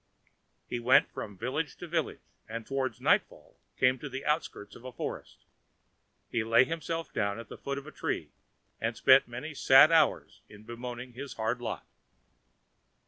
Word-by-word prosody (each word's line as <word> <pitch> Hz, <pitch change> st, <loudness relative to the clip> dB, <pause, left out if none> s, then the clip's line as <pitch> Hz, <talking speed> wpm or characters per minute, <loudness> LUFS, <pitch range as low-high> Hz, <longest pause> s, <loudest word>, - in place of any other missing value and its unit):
He 120 Hz, -, -3 dB
went 125 Hz, +2 st, +4 dB
from 105 Hz, -2 st, -7 dB
village 135 Hz, -, -3 dB
to 175 Hz, -, -8 dB
village, 165 Hz, -2 st, -2 dB, 0.3 s
and 115 Hz, 0 st, -5 dB
towards 130 Hz, -4 st, -2 dB
nightfall -, -, 0 dB, 0.2 s
came 130 Hz, 0 st, +3 dB
to 145 Hz, -, -6 dB
the 135 Hz, +1 st, -6 dB
outskirts 150 Hz, -9 st, -2 dB
of -, -, -13 dB
a 130 Hz, -, -7 dB
forest. 120 Hz, -, -7 dB, 0.8 s
He 115 Hz, -, -1 dB
laid 115 Hz, +3 st, +4 dB
himself 165 Hz, 0 st, -4 dB
down 100 Hz, -1 st, -1 dB
at 115 Hz, -1 st, -9 dB
the -, -, -9 dB
foot 140 Hz, 0 st, -4 dB
of 140 Hz, -, -7 dB
a 155 Hz, -, -9 dB
tree, -, -, -3 dB, 0.5 s
and 115 Hz, 0 st, -2 dB
spent 135 Hz, 0 st, +6 dB
many 125 Hz, +6 st, -6 dB
a -, -, -13 dB
sad 135 Hz, +4 st, +7 dB
hour 165 Hz, -, +4 dB, 0.2 s
in 105 Hz, 0 st, -14 dB
bemoaning 120 Hz, +2 st, -7 dB
his 140 Hz, +3 st, -7 dB
hard 115 Hz, +2 st, -2 dB
lot. 120 Hz, -, -4 dB
125 Hz, 170 wpm, -30 LUFS, 115-140 Hz, 0.8 s, sad